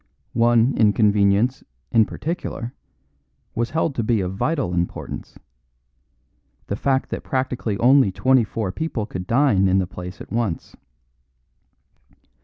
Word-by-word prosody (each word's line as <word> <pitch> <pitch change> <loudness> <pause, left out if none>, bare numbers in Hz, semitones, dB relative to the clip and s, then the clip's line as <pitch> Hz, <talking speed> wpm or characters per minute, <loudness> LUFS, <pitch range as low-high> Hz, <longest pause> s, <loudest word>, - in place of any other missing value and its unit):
One 120 +2 +3
inconvenience, 105 +2 +3 0.3
in 115 -2 +5
particular, 150 -7 -5 0.8
was 115 +1 -1
held 160 -1 0
to 120 - -2
be 110 0 +1
of 90 0 -3
vital 125 - -1
importance: 85 0 -4 1.3
the 100 - -3
fact 135 +4 0
that - - -3
practically 125 -5 -2
only 130 -2 +5
twenty 130 +5 +3
four 105 -2 -3
people 145 -5 -3
could 90 -4 -6
dine 115 -7 +3
in 95 +1 +3
the 95 - +2
place 90 +1 -9
at - - -11
once. 110 -7 -2
115 Hz, 125 wpm, -22 LUFS, 100-130 Hz, 1.3 s, in